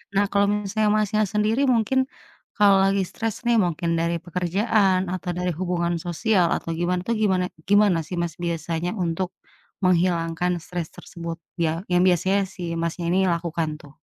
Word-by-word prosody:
Nah, 205 Hz, +1 st, +4 dB
kalo 200 Hz, 0 st, +4 dB, 0.2 s
misalnya, 210 Hz, +1 st, +1 dB
Masnya, 215 Hz, 0 st, +1 dB
sendiri 215 Hz, +5 st, +1 dB
mungkin 240 Hz, +2 st, +2 dB, 0.6 s
kalo 205 Hz, -1 st, +6 dB, 0.2 s
lagi 195 Hz, 0 st, +1 dB
stres 225 Hz, +3 st, -4 dB
nih 235 Hz, -1 st, +3 dB
mungkin 170 Hz, 0 st, -2 dB
dari 170 Hz, 0 st, 0 dB
pekerjaan 185 Hz, +2 st, +1 dB
atau 180 Hz, -1 st, -4 dB
dari 180 Hz, -1 st, -1 dB
hubungan 175 Hz, -1 st, 0 dB
sosial 180 Hz, 0 st, +2 dB
atau -, -, -5 dB
gimana 180 Hz, +1 st, 0 dB
tuh 235 Hz, -, +2 dB
gimana 185 Hz, -3 st, +2 dB, 0.2 s
gimana 205 Hz, -4 st, +5 dB
sih, 180 Hz, -, -5 dB
Mas, 170 Hz, -3 st, -2 dB
biasanya 170 Hz, +1 st, -2 dB
untuk 175 Hz, +2 st, -1 dB, 0.5 s
menghilangkan 175 Hz, -1 st, +2 dB
stres 175 Hz, -2 st, -5 dB
tersebut 170 Hz, -1 st, -7 dB, 0.3 s
ya 165 Hz, +5 st, -2 dB
yang 180 Hz, 0 st, +4 dB
biasanya 190 Hz, +3 st, +3 dB
sih, 175 Hz, -3 st, -5 dB
Masnya, 170 Hz, +1 st, -2 dB
ini 190 Hz, -1 st, +3 dB
lakukan 170 Hz, -1 st, -1 dB
tuh? 145 Hz, +1 st, -16 dB
180 Hz, 155 wpm, -24 LUFS, 170-200 Hz, 0.6 s, kalo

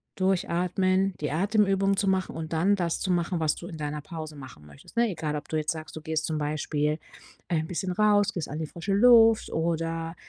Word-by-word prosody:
durchatmen, 185 Hz, +1 st, +1 dB
die 150 Hz, -, -1 dB
Atemübungen 195 Hz, +2 st, +2 dB
zu 200 Hz, -, +1 dB
machen 190 Hz, -1 st, 0 dB
und 160 Hz, -1 st, -6 dB
dann 180 Hz, +6 st, +3 dB
das 175 Hz, -4 st, -1 dB
zu 190 Hz, -, -1 dB
machen, 175 Hz, 0 st, 0 dB
was 155 Hz, -2 st, +1 dB
du 175 Hz, -, -9 dB
in 165 Hz, -, -8 dB
deiner 150 Hz, 0 st, -4 dB
Pause 155 Hz, 0 st, -7 dB
machen 130 Hz, -, -12 dB
möchtest, 75 Hz, -, -16 dB
ne? 235 Hz, 0 st, +4 dB
Egal, 160 Hz, -5 st, -3 dB
ob 145 Hz, -, -8 dB
du 155 Hz, -, -3 dB
jetzt 155 Hz, 0 st, 0 dB
sagst, 160 Hz, -1 st, -7 dB
du 155 Hz, -, -7 dB
gehst 155 Hz, -1 st, -2 dB
zum 155 Hz, -1 st, -2 dB
Beispiel, 150 Hz, 0 st, -1 dB, 0.5 s
äh, 160 Hz, -2 st, +1 dB
bisschen 180 Hz, +2 st, -3 dB
raus, 205 Hz, 0 st, +3 dB
gehst 170 Hz, -6 st, -4 dB
an 150 Hz, -, -5 dB
die 160 Hz, -, -3 dB
frische 175 Hz, +5 st, -4 dB
Luft 225 Hz, 0 st, +6 dB
oder, 165 Hz, 0 st, -2 dB
165 Hz, 210 wpm, -27 LUFS, 155-195 Hz, 0.5 s, Luft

